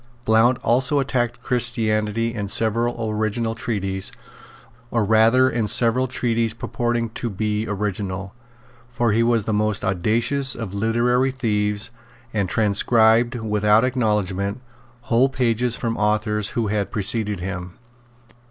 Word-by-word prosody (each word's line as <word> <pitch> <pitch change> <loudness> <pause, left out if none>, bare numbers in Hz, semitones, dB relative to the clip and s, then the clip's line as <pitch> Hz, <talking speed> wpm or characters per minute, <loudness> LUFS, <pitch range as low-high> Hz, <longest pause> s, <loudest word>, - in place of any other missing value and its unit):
Blount 115 +3 +4
also 130 +4 +2
attacked 120 -3 -2
Christianity 115 -2 0
in 105 -3 -4
several 115 +2 0
original 110 +1 -1
treatises, 95 -4 -2 0.8
or 115 -3 0
rather 115 +4 +4
in 115 -4 -1
several 125 +4 +4
treatises 115 -3 -1
purporting 120 -1 -2
to 120 +1 -4
be 105 +1 -2
original; 100 -2 -4 0.6
for 120 -1 0
he 110 +2 +2
was 115 -2 +2
the 110 - -2
most 105 0 0
audacious 115 +8 +1
of 110 -5 -6
literary 120 +5 +1
thieves, 105 -4 -1 0.4
and 100 -4 -1
transcribed, 110 +3 +3
without 105 -1 +2
acknowledgment, 105 -5 -1 0.4
whole 125 +1 +2
pages 120 -2 0
from 115 -1 -2
authors 105 0 0
who 115 - +1
had 105 -1 -1
preceded 105 -1 -1
him. 90 -1 -5
110 Hz, 125 wpm, -22 LUFS, 105-120 Hz, 0.8 s, Blount